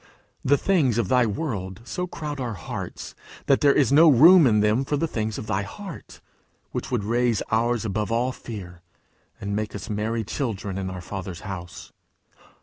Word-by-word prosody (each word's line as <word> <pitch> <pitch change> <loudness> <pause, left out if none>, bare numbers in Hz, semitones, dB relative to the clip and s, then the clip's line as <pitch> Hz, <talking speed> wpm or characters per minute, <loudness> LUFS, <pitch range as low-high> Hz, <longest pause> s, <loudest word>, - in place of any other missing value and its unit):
The 145 +2 +4
things 145 - +2
of 115 -6 0
thy 125 -2 +4
world 100 - -4
so 180 +8 -4
crowd 150 -4 -6
our 120 -4 -3
hearts, 90 - -7 0.3
that 135 - +3
there 145 - +6
is 140 -3 +3
no 160 +3 +7
room 160 +4 +8
in 105 -3 +3
them 105 +5 +2
for 145 +2 -1
the 165 - 0
things 110 -6 -3
of - - -6
thy 100 -2 -1
heart, 175 - -9 0.5
which - - -4
would 120 -5 -1
raise 120 0 +1
ours 115 +1 +1
above 105 +1 -2
all 120 +3 +1
fear, 95 -8 -9 0.6
and 100 +1 -3
make 105 0 -3
us 105 - -6
merry 110 +2 -1
children 105 -5 -3
in 95 -1 -3
our 95 -1 -6
Father's 95 -1 -6
house! 90 -3 -8
115 Hz, 180 wpm, -24 LUFS, 100-135 Hz, 0.6 s, room